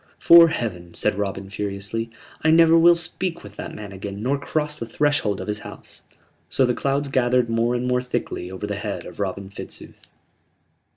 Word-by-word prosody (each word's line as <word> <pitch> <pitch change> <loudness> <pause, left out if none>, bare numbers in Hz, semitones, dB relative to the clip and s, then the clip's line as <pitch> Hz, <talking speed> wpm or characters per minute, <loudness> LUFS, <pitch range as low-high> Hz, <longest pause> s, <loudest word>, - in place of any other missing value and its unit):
"'Fore 170 0 +8
Heaven," 90 - -4
said 105 - +2
Robin, 100 -1 -3
furiously, 100 +3 -4 0.3
"I 160 - +2
never 165 0 +6
will 170 +1 +7
speak 170 +1 -2
with 105 0 -12
that - - -7
man 105 -2 -8
again 100 +2 -7
nor 135 +3 0
cross 150 +1 -2
the 115 - -5
threshold 120 -6 0
of - - -5
his 105 0 -3
house!" - - -12 0.5
So 135 - +2
the 125 - +1
clouds 140 +3 -1
gathered 125 -2 +2
more 115 +2 +1
and 125 +1 -1
more 125 0 +1
thickly 125 -7 -4
over 95 +2 -6
the 105 -1 -3
head 105 0 -5
of - - -11
Robin 100 0 -4
Fitzooth. - - -10
115 Hz, 185 wpm, -23 LUFS, 100-145 Hz, 0.5 s, Fore